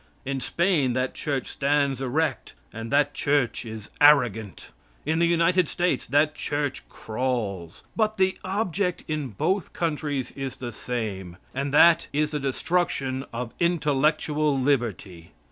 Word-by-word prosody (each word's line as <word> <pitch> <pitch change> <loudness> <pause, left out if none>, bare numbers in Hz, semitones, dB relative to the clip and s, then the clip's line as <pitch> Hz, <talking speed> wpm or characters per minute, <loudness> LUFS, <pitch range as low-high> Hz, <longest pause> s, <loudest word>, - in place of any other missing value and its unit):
In 135 0 -2
Spain 150 -1 +1
that 130 +1 -1
Church 140 -4 -2
stands 140 -2 +1
erect, 150 +5 -1 0.2
and 115 +1 -6
that 145 0 +3
Church 140 -5 0
is 110 -2 -8
arrogant. 120 - +3 0.3
In 160 +2 +1
the 170 - +4
United 170 0 +3
States 175 0 0
that 150 +2 +3
Church 145 -3 -2
crawls. 110 -8 -3
But 215 -1 +1
the 190 0 +2
object 190 -2 -1
in 155 -3 -2
both 180 - -1
countries 150 -5 -2
is 135 -2 -5
the 120 -1 -6
same, 105 -7 -4 0.2
and 140 +1 -2
that 170 +3 +6
is 150 +1 0
the 150 - -2
destruction 135 -2 -1
of 115 0 -5
intellectual 150 -3 +1
liberty. 110 - -1
140 Hz, 135 wpm, -25 LUFS, 125-160 Hz, 0.3 s, that